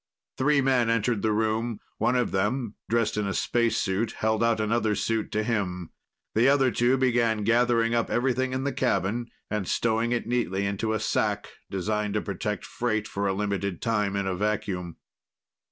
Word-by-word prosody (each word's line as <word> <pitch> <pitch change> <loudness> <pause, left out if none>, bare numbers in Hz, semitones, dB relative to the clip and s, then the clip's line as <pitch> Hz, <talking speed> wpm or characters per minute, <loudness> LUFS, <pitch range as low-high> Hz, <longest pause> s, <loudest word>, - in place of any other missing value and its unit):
Three 145 +1 +3
men 130 -3 +2
entered 115 -1 +1
the 110 - +1
room. 110 +1 0 0.2
One 125 - +2
of 125 -1 +1
them, 105 +4 0 0.2
dressed 115 -2 +1
in 105 -1 0
a 95 - -2
spacesuit, 115 -2 0
held 110 +1 0
out 115 -1 +2
another 110 0 +1
suit 110 0 -1
to 110 - +1
him. 90 -7 -2 0.4
The 115 +4 +4
other 135 -2 +4
two 120 +4 +2
began 120 -4 +2
gathering 115 +1 +3
up 115 -1 +1
everything 130 +1 +1
in 130 +1 -2
the 140 - -1
cabin 120 -1 0 0.2
and 105 -4 -1
stowing 115 +1 +1
it 120 - 0
neatly 110 -5 0
into 100 +3 -1
a 110 - 0
sack - - 0 0.2
designed 105 +2 -1
to 105 - +1
protect 105 0 -3
freight 110 -3 -2
for 100 -1 -2
a 95 - +1
limited 100 -2 -2
time 105 -3 0
in 100 0 -1
a 95 - -1
vacuum. 95 -4 -2
110 Hz, 175 wpm, -26 LUFS, 100-120 Hz, 0.4 s, The